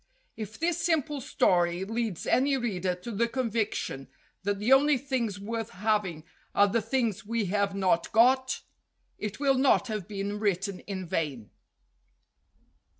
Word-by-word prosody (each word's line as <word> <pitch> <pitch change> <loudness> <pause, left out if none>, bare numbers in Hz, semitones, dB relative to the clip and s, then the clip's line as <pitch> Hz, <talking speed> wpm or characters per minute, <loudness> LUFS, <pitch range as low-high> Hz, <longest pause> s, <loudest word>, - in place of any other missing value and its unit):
If 215 -1 -7
this 335 0 0
simple 300 -4 0
story 175 -6 +2
leads 225 -4 -3
any 270 +1 +3
reader 190 -7 -1
to 180 +7 -8
the 230 +2 +1
convic 230 -3 -1
tion 135 -1 -4 0.3
that 200 +1 -1
the 215 +6 +3
only 285 +1 +5
things 240 -6 -2
worth 225 +2 -4
having 205 -7 -1 0.3
are 205 - +6
the 230 +3 +1
things 225 -3 -1
we 225 +1 -1
have 200 -1 +1
not 185 -3 +1
got, 260 +4 +4 0.6
it 210 +2 -4
will 270 -2 +3
not 265 -2 +3
have 210 -5 -3
been 205 0 -3
written 195 -2 -1
in 190 -2 -6
vain. 150 - -3
215 Hz, 150 wpm, -28 LUFS, 195-245 Hz, 0.6 s, are